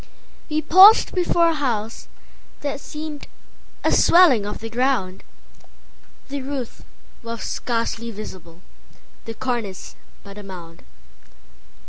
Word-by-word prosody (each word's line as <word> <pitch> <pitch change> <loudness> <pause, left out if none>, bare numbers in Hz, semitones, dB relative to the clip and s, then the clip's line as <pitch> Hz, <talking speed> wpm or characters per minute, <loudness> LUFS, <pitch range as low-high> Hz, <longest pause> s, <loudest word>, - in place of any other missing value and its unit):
We 310 0 -1
paused 375 +8 +7
before 345 -2 +2
a - - 0
house 235 -7 -3 0.5
that 285 -1 -4
seemedA 300 0 -8 0.6
swelling 285 - +5
of 210 - -5
the 225 - -7
ground; 235 -6 -1 1.1
The 280 0 -4
roof 265 -3 -6 0.4
was 230 -1 -6
scarcely 230 -1 -3
visible, 185 -6 -10 0.6
The 225 - -7
cornice 235 -7 -4 0.3
but 200 +1 -11
a - - -10
mound. 175 -4 -11
235 Hz, 105 wpm, -21 LUFS, 210-290 Hz, 1.1 s, paused